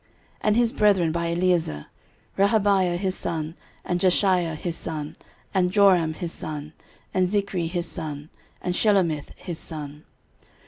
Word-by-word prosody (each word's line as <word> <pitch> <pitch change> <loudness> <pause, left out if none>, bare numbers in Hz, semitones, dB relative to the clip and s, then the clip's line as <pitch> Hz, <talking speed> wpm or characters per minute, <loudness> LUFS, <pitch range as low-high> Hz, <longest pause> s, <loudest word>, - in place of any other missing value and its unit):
13:026:025 - - -35 0.3
And 215 +1 +2
his 235 -1 +3
brethren 190 -6 +3
by 170 +1 -1
Eliezer; 170 - +1 0.5
Rehabiah 195 -3 +3
his 190 0 -1
son, 160 -1 -3 0.3
and 175 - 0
Jeshaiah 180 -2 +2
his 170 +2 -3
son, 155 -4 -5 0.4
and 180 -2 +2
Joram 185 -5 +4
his 175 -1 -4
son, 150 -1 -6 0.4
and 185 -1 +3
Zichri 195 -3 0
his 175 0 -2
son, 150 -1 -6 0.3
and 180 - 0
Shelomith 180 -8 +2
his 170 -3 -6
son. 150 -2 -7
175 Hz, 140 wpm, -25 LUFS, 160-195 Hz, 0.5 s, Joram